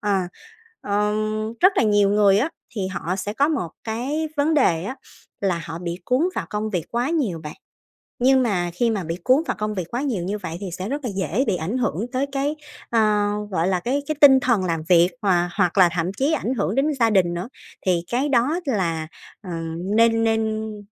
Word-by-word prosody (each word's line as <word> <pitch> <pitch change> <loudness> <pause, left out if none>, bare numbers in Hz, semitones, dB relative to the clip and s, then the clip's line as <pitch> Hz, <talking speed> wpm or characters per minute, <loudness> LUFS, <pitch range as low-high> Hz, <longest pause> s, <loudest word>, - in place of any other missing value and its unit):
Ờ, 205 -2 +1 0.6
ờ, 210 +1 0 0.5
rất 375 - +6
là - - +4
nhiều 205 -2 +3
người 205 -1 +4
á, 265 +9 +1 0.3
thì 200 -4 -2
họ 180 -1 -3
sẽ 205 +1 -3
có 280 +7 +2
một 275 - -1
cái 265 +8 -2
vấn 295 +2 +2
đề 175 - +2
á 260 +6 -5 0.4
là 180 -4 0
họ 160 - -6
bị 170 0 -4
cuốn 255 +2 +1
vào - - -3
công 210 +1 -2
việc 180 -6 -2
quá 240 +3 0
nhiều 240 - -1
bạn. 150 - -6 0.7
Nhưng 260 +1 +4
mà 180 -6 0
khi 235 +6 +1
mà 210 -4 -1
bị 165 +1 -3
cuốn 265 +5 +4
vào - - -2
công 210 0 -2
việc 185 -4 -3
quá 245 - -2
nhiều 245 -11 -1
như 200 +4 -2
vậy 170 -4 -6
thì 195 -2 -6
sẽ 185 +4 -5
rất 285 +1 -3
là - - -1
dễ 190 - 0
bị 200 - +2
ảnh 180 +8 -2
hưởng 225 -5 -1
tới 260 +2 +1
cái, 280 +2 -1 0.3
ờ, 230 - +2 0.5
gọi 175 -2 +1
là, 185 -1 +1
cái 260 +10 -1
cái 310 - -1
tinh 270 -2 +8
thần 235 -7 +1
làm 165 -3 -1
việc 175 0 +6
hòa 175 -4 +2
hoặc 180 +2 +1
là 180 -2 +7
thậm 175 +2 -1
chí 280 +4 +1
ảnh 260 -5 -1
hưởng 205 -4 -1
đến 275 - +2
gia 230 -1 +4
đình 185 -5 +2
nữa. 175 +6 -5 0.4
Thì 175 -3 +2
cái 260 +5 +1
đó 275 +6 +2
là, 170 - -1 0.3
ờ, 195 - -10 0.5
nên 225 0 +4
nên, 220 -1 0
ừ, 210 -1 -9
210 Hz, 220 wpm, -22 LUFS, 180-255 Hz, 0.7 s, tinh